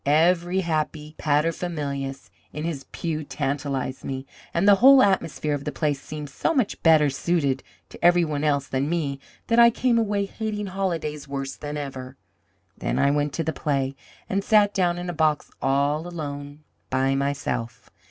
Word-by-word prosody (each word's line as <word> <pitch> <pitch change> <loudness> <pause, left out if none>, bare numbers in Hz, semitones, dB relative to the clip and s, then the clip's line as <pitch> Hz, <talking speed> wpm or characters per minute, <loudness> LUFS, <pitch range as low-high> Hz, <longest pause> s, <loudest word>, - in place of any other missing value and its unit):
Every 175 +5 +3
happy 155 -2 -2
paterfamilias 145 -3 -1 0.2
in 150 - -5
his 160 -5 -4
pew 155 -2 -3
tantalized 135 -2 -3
me, 130 0 -4 0.3
and 170 +4 +1
the 205 - +9
whole 270 +1 +9
atmosphere 165 -6 +1
of 145 -1 -3
the 150 - -3
place 145 -3 -1
seemed 150 -2 -7
so 330 - 0
much 255 -7 0
better 155 -2 +6
suited 140 -3 0 0.3
to - - -13
every 175 0 +5
one 150 -2 -2
else 140 -2 +1
than 135 +2 -1
me 145 -5 -1 0.3
that 230 0 +3
I 235 0 +9
came 235 0 +2
away 205 -2 0
hating 210 0 -4
holidays 170 -7 -3
worse 135 -1 -4
than 150 0 -6
ever. 135 -2 -6 0.6
Then - - -2
I 140 - +3
went 145 0 0
to 165 - -1
the 160 +1 -2
play, 140 -3 -1 0.3
and 195 +1 -1
sat 205 -1 +4
down 175 -3 +1
in 175 0 -5
a 175 - -3
box 155 -2 +1
all 140 +4 +1
alone 145 -3 -6 0.3
by 135 +1 +1
myself. 130 -4 -3
150 Hz, 170 wpm, -24 LUFS, 140-175 Hz, 0.6 s, the